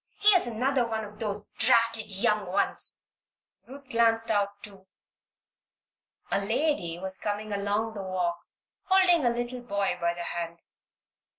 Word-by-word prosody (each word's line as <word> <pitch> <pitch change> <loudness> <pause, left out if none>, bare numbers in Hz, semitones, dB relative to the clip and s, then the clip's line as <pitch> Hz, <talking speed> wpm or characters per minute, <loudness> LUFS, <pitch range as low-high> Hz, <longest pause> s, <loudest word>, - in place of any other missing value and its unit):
"Here's 405 -8 +5
another 250 +2 0
of 210 -1 -5
those 210 -2 -2
dratted 230 -2 +3
young 210 0 +1
ones!" 190 +3 +1 0.6
Ruth 275 +1 -12
glanced 230 -1 +2
out, 205 -2 +2
too. 195 -3 -12 1.4
A 200 0 +1
lady 220 - -1
was 190 +1 +1
coming 210 0 -3
along 205 +2 -1
the 205 - -6
walk 180 -2 -2 0.5
holding 370 -4 +4
a 240 - +4
little 240 +1 -3
boy 200 -6 -2
by 170 0 0
the 175 - -5
hand. 170 0 -5
215 Hz, 130 wpm, -27 LUFS, 195-240 Hz, 1.4 s, Here's